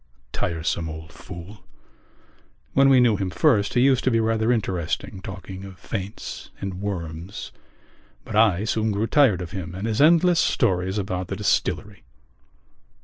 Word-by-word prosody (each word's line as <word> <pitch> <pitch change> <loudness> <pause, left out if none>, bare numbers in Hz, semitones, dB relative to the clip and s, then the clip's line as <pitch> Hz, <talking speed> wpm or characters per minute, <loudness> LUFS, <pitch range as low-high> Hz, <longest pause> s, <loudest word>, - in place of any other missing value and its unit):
Tiresome 80 0 -2
old 80 +1 -8
fool! 95 +3 -10 1.1
When 135 0 +5
we 130 -1 +6
knew 120 -4 +4
him 95 -1 -2
first 100 - +2
he 120 - +4
used 130 -1 +4
to - - +4
be 115 -2 +2
rather 110 +1 +1
interesting, 95 -4 -2
talking 95 0 -8
of 95 -1 -10
faints 100 +2 -6
and 95 -1 -5
worms; 90 -1 -5 0.7
but 110 - -6
I 105 -3 +4
soon 110 0 0
grew 105 +2 0
tired 115 -9 +3
of 85 - -8
him 90 -2 -6
and 95 +3 -4
his 115 +2 0
endless 170 +2 +5
stories 95 +1 +1
about 95 -2 -2
the 95 - -4
distillery. 100 -1 -1
100 Hz, 150 wpm, -24 LUFS, 90-115 Hz, 1.1 s, we